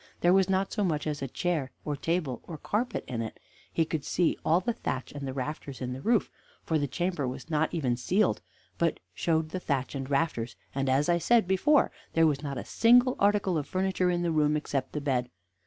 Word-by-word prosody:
There 175 +1 +5
was 190 0 +4
not 190 0 +1
so 210 - 0
much 155 -5 0
as 150 -2 -2
a 135 - -2
chair 155 -1 -1 0.2
or 150 - -1
table 155 -4 -1
or 160 - -6
carpet 220 - -2
in 120 -2 -3
it; 110 - -6 0.3
he 165 - +2
could 155 -2 -3
see 175 +2 +1
all 165 +3 +4
the 235 +6 -1
thatch 130 - -4
and 140 -1 -6
the - - -2
rafters 140 0 -5
in 125 -1 -3
the 130 - -7
roof, 230 +3 +2 0.3
for 160 -1 +1
the 145 - 0
chamber 175 -2 -1
was 130 +6 -6
not 155 +1 +1
even 135 -8 0
ceiled, 185 - +1 0.4
but - - +1
showed 160 -2 0
the 185 - -3
thatch 140 -6 -1
and 135 -1 -4
rafters, 135 -6 0 0.2
and, 135 0 0
as 135 +3 +3
I 175 0 +3
said 230 +2 +3
before, 275 +11 +3 0.2
there 165 0 +5
was 145 -3 +2
not 140 -3 -4
a - - -5
single 245 +2 +5
article 200 -4 +2
of 145 - -5
furniture 185 -1 +1
in 175 0 0
the 170 - +1
room, 150 -1 +3
except 140 -3 -3
the 150 - -2
bed. 125 -4 0
155 Hz, 220 wpm, -29 LUFS, 135-185 Hz, 0.4 s, There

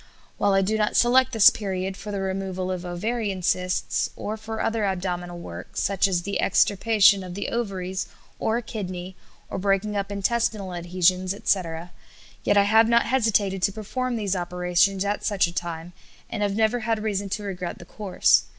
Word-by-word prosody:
While 200 - +3
I 195 - +4
do 220 +3 0
not 210 - +1
select 255 +2 +4
this 225 -4 +7
period 190 -2 -3
for 205 +2 -7
the 200 -1 -3
removal 190 -1 -3
of 185 -1 -4
ovarian 200 +1 -2
cysts, 180 +1 0
or 215 - -4
for 220 0 -6
other 225 -1 0
abdominal 180 -2 -2
work, 90 - -9
such 195 0 +2
as 180 -2 0
the 200 +2 -2
extirpation 200 -1 +4
of 180 -1 -7
the 200 - -3
ovaries, 190 -5 -3 0.3
or 220 - +1
a 240 - -4
kidney, 185 -4 -6 0.3
or - - -4
breaking 200 +2 0
up 200 0 -2
intestinal 200 -1 -1
adhesions, 180 +2 +1
etc., 175 -4 -1 0.5
yet 205 - +3
I 200 - +7
have 220 +2 +5
not 235 0 +4
hesitated 210 -6 +1
to 200 - +2
perform 240 +5 -3
these 205 -4 -1
operations 180 +2 +1
at 205 +1 -1
such 200 -3 +2
a 170 - -5
time, 170 0 -5 0.4
and - - -3
have 200 -1 0
never 220 +2 +2
had 225 -1 -1
reason 200 -2 -2
to 210 - -3
regret 180 -3 -5
the 175 - -12
course. 185 - +2
195 Hz, 180 wpm, -25 LUFS, 180-215 Hz, 0.5 s, this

